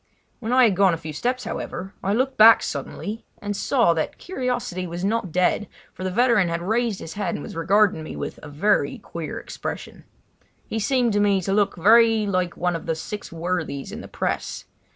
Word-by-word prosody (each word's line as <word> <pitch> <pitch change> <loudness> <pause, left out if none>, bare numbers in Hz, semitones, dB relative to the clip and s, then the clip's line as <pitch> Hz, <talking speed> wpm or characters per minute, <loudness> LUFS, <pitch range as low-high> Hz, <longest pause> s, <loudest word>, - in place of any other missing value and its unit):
When 230 -1 -4
I 255 0 +6
had 215 -5 +4
gone 190 -2 +4
a - - -7
few 155 -1 -7
steps, 250 - -1
however, 195 -3 -5
I 195 - 0
looked 260 +5 +1
back 225 +1 +8
suddenly, 170 +9 -5 0.2
and 205 0 -3
saw 235 -4 +3
that 160 -1 -2
curiosity 245 - -3
was 175 +2 -4
not 205 -4 -1
dead, 180 +4 +1 0.3
for 185 - -8
the 185 - -1
veteran 230 -3 +3
had 170 0 -2
raised 225 +1 0
his 165 - -7
head 200 -4 -2
and - - -6
was - - -8
regarding 185 +1 +3
me 155 - -7
with - - -5
a 150 - -9
very 200 +9 +1
queer - - -6
expression. - - -7 0.6
He 220 - -3
seemed 240 0 +1
to 205 - +2
me 200 -1 +3
to 195 +2 -1
look 205 -1 +2
very 225 +4 +5
like 185 -3 -1
one 180 0 0
of 165 - -6
the 165 - 0
six 205 +6 -7
worthies 165 -4 -3
in - - -7
the - - -9
press. - - -3
200 Hz, 205 wpm, -23 LUFS, 175-225 Hz, 0.6 s, back